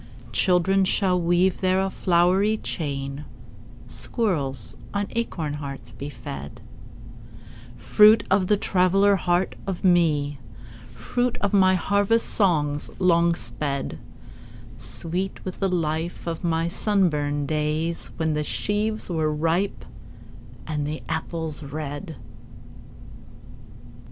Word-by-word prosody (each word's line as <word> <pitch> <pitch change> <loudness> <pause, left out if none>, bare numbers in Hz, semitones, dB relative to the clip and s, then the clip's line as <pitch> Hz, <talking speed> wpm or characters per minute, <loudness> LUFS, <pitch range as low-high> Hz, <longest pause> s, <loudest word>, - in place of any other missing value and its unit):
Children 190 +1 +3
shall 185 -1 +1
weave 175 +2 +2
there 185 0 +2
a 190 0 0
flowery 185 +5 +2
chain, 140 -5 -4 0.6
Squirrels 135 - -1 0.2
on 200 0 +1
acorn 170 -10 -2
hearts 140 -2 -5
be 140 - -6
fed:— 70 - -8 1.2
Fruit 210 - +6
of 190 -1 +3
the 210 - +3
traveller 195 +1 +3
heart 180 0 +1
of 190 -3 -4
me, 155 -6 +2 0.5
Fruit 245 0 -2
of 200 -1 -1
my 185 -2 +5
harvest 205 +4 +2
songs 150 -8 +1
long 170 -2 +3
sped: 140 -4 -3 0.8
Sweet 180 +4 -4
with 185 - -6
the 195 - +1
life 165 -1 -2
of 165 0 -4
my 165 -1 +1
sunburned 155 -7 +1
days 155 +2 -1
When 160 -1 0
the 150 0 -1
sheaves 215 +6 -2
were 160 -3 0
ripe, 165 +6 -1 0.8
and 150 -2 -2
the 155 +1 -5
apples 160 -1 -2
red. 150 +3 -6
170 Hz, 110 wpm, -24 LUFS, 150-190 Hz, 1.2 s, Fruit